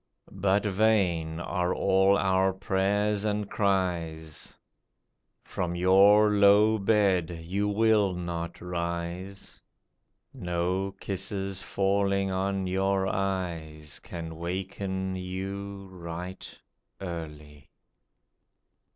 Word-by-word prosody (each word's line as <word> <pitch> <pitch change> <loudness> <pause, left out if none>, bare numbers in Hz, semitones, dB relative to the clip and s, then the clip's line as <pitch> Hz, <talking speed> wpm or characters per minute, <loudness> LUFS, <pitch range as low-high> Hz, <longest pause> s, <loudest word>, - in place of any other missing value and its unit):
But 100 +2 +1
vain 95 -6 +1
are 90 0 -1
all 95 +1 +3
our 95 0 +2
prayers 100 +2 0
and 105 -1 -1
cries; 85 -6 -2 0.9
From 85 -1 -3
your 100 +4 +6
low 105 +2 +5
bed 100 -4 +2
you 100 +5 -1
will 105 -2 +3
not 85 -1 -5
rise; 85 +2 -5 0.7
No 90 -3 -2
kisses 95 0 -3
falling 100 0 0
on 95 0 -1
your 95 +1 +1
eyes, 85 -6 -3
Can 80 -1 -7
waken 95 +2 -3
you 95 +2 -5
right 90 +1 -8 0.4
early. 75 -5 -8
95 Hz, 85 wpm, -28 LUFS, 85-100 Hz, 0.9 s, your